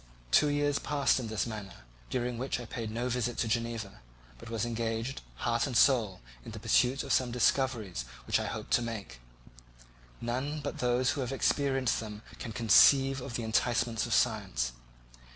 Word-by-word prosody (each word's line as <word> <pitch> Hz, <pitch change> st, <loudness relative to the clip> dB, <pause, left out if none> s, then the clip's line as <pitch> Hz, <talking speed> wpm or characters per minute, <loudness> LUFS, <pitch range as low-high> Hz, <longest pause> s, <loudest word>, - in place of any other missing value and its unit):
Two 150 Hz, -, +5 dB
years 145 Hz, 0 st, +1 dB
passed 145 Hz, -2 st, +1 dB
in 120 Hz, -, -4 dB
this 110 Hz, -1 st, -1 dB
manner, 105 Hz, -, -8 dB, 0.3 s
during 125 Hz, -1 st, -2 dB
which 130 Hz, 0 st, -2 dB
I 120 Hz, -, -7 dB
paid 115 Hz, -1 st, -5 dB
no 120 Hz, +3 st, -2 dB
visit 120 Hz, -1 st, -1 dB
to 115 Hz, -, 0 dB
Geneva, 115 Hz, -, -3 dB, 0.4 s
but -, -, -10 dB
was 115 Hz, 0 st, -1 dB
engaged, 115 Hz, +2 st, -3 dB
heart 120 Hz, -, 0 dB
and 125 Hz, -4 st, 0 dB
soul, 115 Hz, -9 st, +3 dB, 0.2 s
in -, -, -9 dB
the -, -, -7 dB
pursuit 130 Hz, +3 st, +2 dB
of 140 Hz, -, -1 dB
some 130 Hz, -1 st, +2 dB
discoveries 120 Hz, -, 0 dB, 0.2 s
which -, -, +2 dB
I -, -, -3 dB
hoped -, -, -6 dB
to -, -, +4 dB
make. 110 Hz, -, -6 dB, 1.0 s
None 130 Hz, +6 st, -2 dB
but 140 Hz, -, -5 dB
those 125 Hz, +1 st, +2 dB
who 140 Hz, +1 st, -3 dB
have 125 Hz, 0 st, -3 dB
experienced 135 Hz, -1 st, +1 dB
them 105 Hz, -1 st, -7 dB, 0.2 s
can 120 Hz, -, -5 dB
conceive 135 Hz, +4 st, +5 dB
of 125 Hz, -2 st, -6 dB
the 120 Hz, -, -2 dB
enticements 115 Hz, 0 st, +1 dB
of -, -, -1 dB
science. 60 Hz, 0 st, +1 dB
120 Hz, 175 wpm, -30 LUFS, 110-130 Hz, 1.0 s, Two